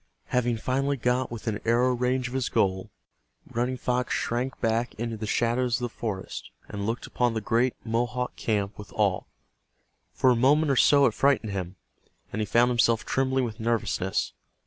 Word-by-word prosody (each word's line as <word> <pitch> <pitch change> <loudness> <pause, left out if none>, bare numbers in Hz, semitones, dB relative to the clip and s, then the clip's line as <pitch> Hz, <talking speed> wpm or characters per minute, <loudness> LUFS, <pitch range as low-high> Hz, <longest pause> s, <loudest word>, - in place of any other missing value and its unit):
Having 120 -2 +1
finally 135 +4 0
got 125 +1 0
within 110 -2 -4
arrow 120 +2 +3
range 125 +1 0
of 120 - -8
his 130 -2 -1
goal, 95 -1 0 0.6
Running 125 +2 -2
Fox 125 +1 -1
shrank 125 +3 -2
back 115 +1 0
into 115 0 -3
the 110 0 -5
shadows 120 +2 +1
of 125 - -3
the 120 -2 -3
forest, 100 -5 -5 0.2
and 100 0 -4
looked 115 +2 -2
upon 120 -2 0
the - - +1
great 120 +4 +1
Mohawk 120 +2 -1
camp 105 -2 -2
with 105 - -10
awe. 100 -4 +1 0.9
For 130 - +3
a - - +3
moment 140 +5 +3
or - - +2
so 140 +2 +5
it 120 - +2
frightened 135 -5 +2
him, 95 -1 -4 0.6
and 110 - -1
he 105 - -1
found 120 +1 +4
himself 115 -2 +2
trembling 130 0 +1
with 110 -3 -4
nervousness. 110 -5 -1
120 Hz, 175 wpm, -27 LUFS, 110-125 Hz, 0.9 s, so